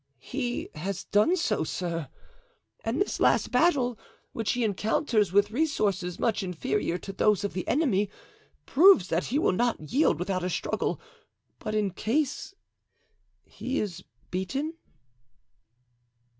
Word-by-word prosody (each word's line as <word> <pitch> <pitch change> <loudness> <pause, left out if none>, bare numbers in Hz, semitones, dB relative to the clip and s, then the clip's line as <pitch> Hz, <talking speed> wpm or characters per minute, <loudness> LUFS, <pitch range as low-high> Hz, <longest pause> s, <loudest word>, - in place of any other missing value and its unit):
"He 245 - -3
has 185 +5 -4
done 215 - +3
so, 250 - 0
sir, 165 -3 -3 0.7
and 230 +6 -1
this 400 - 0
last - - +3
battle, 265 -9 +2 0.3
which 225 -2 -1
he 245 - 0
encounters 215 - +1
with 205 +2 +3
resources 210 - 0
much 225 -2 0
inferior 180 0 -1
to 195 +2 -8
those 210 +1 +2
of 205 - -2
the 185 - -4
enemy, 210 -10 +2 0.6
proves 305 - +6
that 165 +2 0
he 265 - -1
will 305 - +3
not 185 -6 -1
yield 285 - +3
without 185 +1 -2
a 180 - -1
struggle; - - -1 0.6
but 215 - -4
in 210 -2 +1
case 280 - -1 0.9
he 260 +2 -3
is 185 -4 -4 0.3
beaten?" 270 - -2
210 Hz, 130 wpm, -27 LUFS, 185-260 Hz, 0.9 s, proves